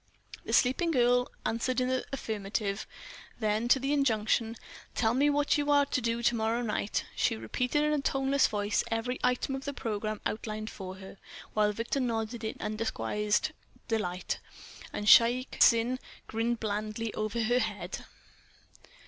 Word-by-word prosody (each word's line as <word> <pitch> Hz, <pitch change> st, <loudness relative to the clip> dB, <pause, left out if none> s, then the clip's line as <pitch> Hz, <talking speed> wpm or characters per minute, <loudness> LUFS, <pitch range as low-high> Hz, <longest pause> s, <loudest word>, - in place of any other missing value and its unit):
The -, -, -4 dB
sleeping 265 Hz, +7 st, +3 dB
girl 245 Hz, -3 st, +3 dB
answered 245 Hz, +3 st, 0 dB
in 250 Hz, -, +1 dB
the 260 Hz, 0 st, 0 dB
affirmative. 210 Hz, -4 st, -3 dB, 0.5 s
Then, 215 Hz, +1 st, 0 dB
to 265 Hz, -, +5 dB
the 275 Hz, +2 st, 0 dB
injunction, 225 Hz, -4 st, +1 dB, 0.4 s
"Tell 225 Hz, -1 st, +2 dB
me 280 Hz, +4 st, +3 dB
what 290 Hz, 0 st, +2 dB
you 290 Hz, 0 st, -1 dB
are 285 Hz, -1 st, +5 dB
to 255 Hz, -, -1 dB
do 230 Hz, 0 st, -1 dB
to 240 Hz, -, +4 dB
morrow 225 Hz, +2 st, 0 dB
night?" 210 Hz, -2 st, -1 dB
she -, -, +1 dB
repeated 250 Hz, -, -1 dB
in 300 Hz, 0 st, +2 dB
a 295 Hz, -, +1 dB
toneless 270 Hz, 0 st, +2 dB
voice 205 Hz, 0 st, 0 dB
every 235 Hz, +2 st, -2 dB
item 250 Hz, +2 st, +1 dB
of 270 Hz, 0 st, -5 dB
the 285 Hz, -, -3 dB
programme 215 Hz, -2 st, -3 dB
outlined 215 Hz, 0 st, -3 dB
for 185 Hz, -1 st, -7 dB
her, 190 Hz, 0 st, -11 dB, 0.3 s
while 210 Hz, -1 st, +3 dB
Victor 230 Hz, +6 st, -2 dB
nodded 230 Hz, -2 st, -2 dB
in 220 Hz, -, -3 dB
undisguised 210 Hz, -, -1 dB, 0.4 s
delight, 185 Hz, -6 st, -2 dB, 0.5 s
and 205 Hz, -, -4 dB
Shaik 240 Hz, +4 st, +5 dB
Tsin 235 Hz, +2 st, +5 dB, 0.3 s
grinned 230 Hz, +1 st, -1 dB
blandly 215 Hz, +1 st, -3 dB
over 215 Hz, +2 st, -1 dB
her 240 Hz, +3 st, +3 dB
head. -, -, -4 dB
230 Hz, 155 wpm, -30 LUFS, 215-255 Hz, 0.5 s, to